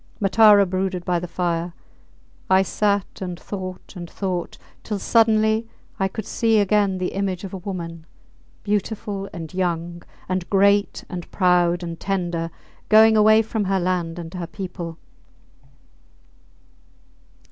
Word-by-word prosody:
Matara 205 0 +6
brooded 185 -1 -2
by 175 -1 +1
the 180 - -6
fire. 170 0 -2 0.8
I 190 0 +5
sat 200 0 -1
and 180 -2 -5
thought 185 -2 -7
and 175 -2 -7
thought, 185 -3 -4 0.2
till 210 - -3
suddenly 220 +1 +3 0.3
I 195 - +2
could 205 +2 -6
see 225 -1 +1
again 205 -1 +2
the 185 0 -1
image 190 -2 -2
of 195 - -7
a - - -3
woman, 170 -3 -6 0.6
beautiful, 205 -1 -2
and 165 0 -8
young, 175 -2 -2 0.3
and 185 -1 -2
great 200 +1 +3
and 180 -2 -7
proud, 175 -2 +2
and 170 -1 -6
tender, 175 -4 -2 0.4
going 220 +1 +7
away 215 +1 +6
from 220 -1 -2
her 195 0 +1
land 175 -2 -1
and 170 0 -7
her 180 -2 -5
people. 175 -4 -6
190 Hz, 135 wpm, -22 LUFS, 175-205 Hz, 0.8 s, going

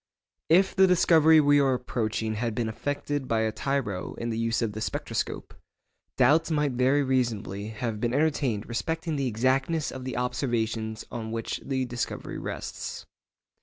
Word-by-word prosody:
If 190 +4 +4
the 190 0 +6
discovery 160 -3 +6
we 145 -1 +5
are 135 -2 +3
approaching 110 -3 -2
had 115 0 -2
been 120 -2 -1
effected 145 +4 -3
by 115 -1 +1
a 110 0 +1
tyro 110 -5 -2
in 115 0 -3
the 110 - -2
use 115 +1 0
of 110 - -1
the 110 - -5
spectroscope, - - -3 0.6
doubts 150 +6 +4
might 150 -3 +1
very 130 +3 +2
reasonably 115 -6 -1
have 110 0 -4
been 120 +1 0
entertained 140 -6 0
respecting 160 +7 -2
the 135 -2 0
exactness 130 +7 +1
of 130 - -7
the 130 -1 -4
observations 115 -3 -2
on 110 -2 -5
which 115 0 -3
the 130 -2 -1
discovery 120 -1 -4
rests. - - -6
125 Hz, 160 wpm, -27 LUFS, 110-145 Hz, 0.6 s, the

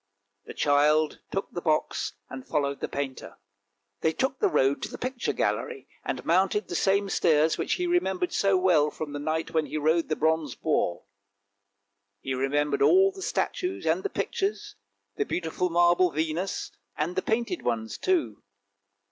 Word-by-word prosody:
The - - -9
child 150 +2 +3
took 195 - -3
the 175 - -5
box, 155 -2 0
and 130 -1 -9
followed 140 -1 -1
the - - -3
painter. 140 -2 -5 0.6
They 160 - +2
took 265 - -1
the 420 - +3
road 135 - +2
to - - -4
the - - -8
picture 255 0 -2
gallery, 470 -3 -2 0.2
and - - -4
mounted 190 +4 +2
the - - -4
same 200 +3 +2
stairs 160 -4 +3
which - - 0
he 360 - -1
remembered 190 - 0
so 195 -1 +3
well, 175 -5 +3
from 150 -1 -6
the 145 - -4
night 155 +2 -2
when 160 -2 +1
he - - -4
rode 160 +3 +1
the 155 - +1
bronze 160 -3 0
boar. 85 0 0 1.2
He 135 +5 -3
remembered 140 +2 0
all 385 +2 +6
the 390 0 -11
statues 370 0 -2
and - - +2
the 405 - -2
pictures, 395 +1 -2 0.4
the 420 - +2
beautiful 180 - -2
marble 175 +1 +4
Venus, 160 +4 -2 0.3
and 165 +4 -1
the 185 - +1
painted 235 - -1
ones 110 -2 -2
too. 370 -4 0
165 Hz, 165 wpm, -27 LUFS, 150-200 Hz, 1.2 s, all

